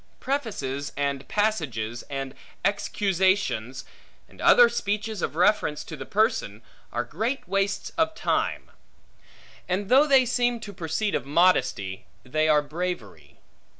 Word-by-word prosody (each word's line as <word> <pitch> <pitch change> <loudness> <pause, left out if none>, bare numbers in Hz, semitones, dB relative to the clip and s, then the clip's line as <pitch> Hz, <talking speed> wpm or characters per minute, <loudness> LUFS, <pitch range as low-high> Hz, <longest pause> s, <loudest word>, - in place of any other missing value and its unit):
Prefaces 170 - -3
and 140 -1 -2
passages, 130 - -1
and 135 -1 -4 0.3
excusations, 190 - 0 0.4
and - - -15
other 485 -1 +7
speeches 205 - -2
of - - -2
reference 180 -4 +2
to 160 - -8
the 135 -2 -8
person, 205 - 0 0.3
are 120 - -1
great 225 - -3
wastes 195 +1 -1
of 320 0 +2
time; - - -1 1.0
and 190 +2 -1
though 275 +4 +6
they 270 -3 +5
seem 245 0 +1
to 205 -2 -8
proceed 180 +5 -2
of 130 - -2
modesty, 140 - +2 0.2
they 155 +4 0
are 150 -1 +4
bravery. 145 - -5
180 Hz, 125 wpm, -26 LUFS, 140-215 Hz, 1.0 s, other